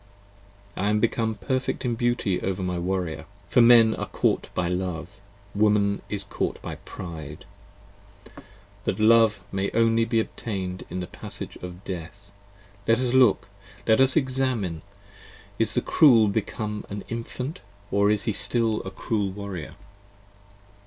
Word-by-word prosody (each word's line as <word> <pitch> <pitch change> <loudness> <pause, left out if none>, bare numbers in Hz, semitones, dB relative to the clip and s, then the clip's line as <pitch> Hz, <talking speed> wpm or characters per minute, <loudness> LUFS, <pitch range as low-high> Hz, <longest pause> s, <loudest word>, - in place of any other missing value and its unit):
I 100 - 0
am 105 0 +2
become 115 0 0
perfect 130 +6 -2
in 120 - +1
beauty 120 -5 0
over 95 0 -2
my 90 -1 -2
Warrior, 90 -2 -2 0.2
For 125 - +4
Men 115 -2 +7
are - - -4
caught - - 0
by 90 -1 0
Love: 90 +1 -4 0.3
Woman 105 -1 +2
is 100 -1 -3
caught 100 - -3
by - - -5
Pride, 80 -5 -8 1.4
That - - -1
Love 110 0 +5
may 95 0 -1
only 115 0 +3
be 115 0 +1
obtain'd 95 -5 -4
in 90 - -4
the - - -3
passages - - -7
of 90 +1 -8
Death. 95 +3 -7 0.6
Let 115 0 +5
us 125 0 0
look: 125 -6 +4 0.4
let 110 +3 +4
us 135 0 +4
examine: 130 - 0 0.8
is - - +1
the - - +2
Cruel 115 -9 +5
become 105 0 -3
an 100 0 -5
Infant 125 +5 -5 0.3
Or 100 0 +3
is 105 -1 +1
he 110 - -1
still 115 0 +1
a 95 - -6
cruel 105 0 -2
Warrior? 95 -4 -7
105 Hz, 145 wpm, -25 LUFS, 95-115 Hz, 1.4 s, Men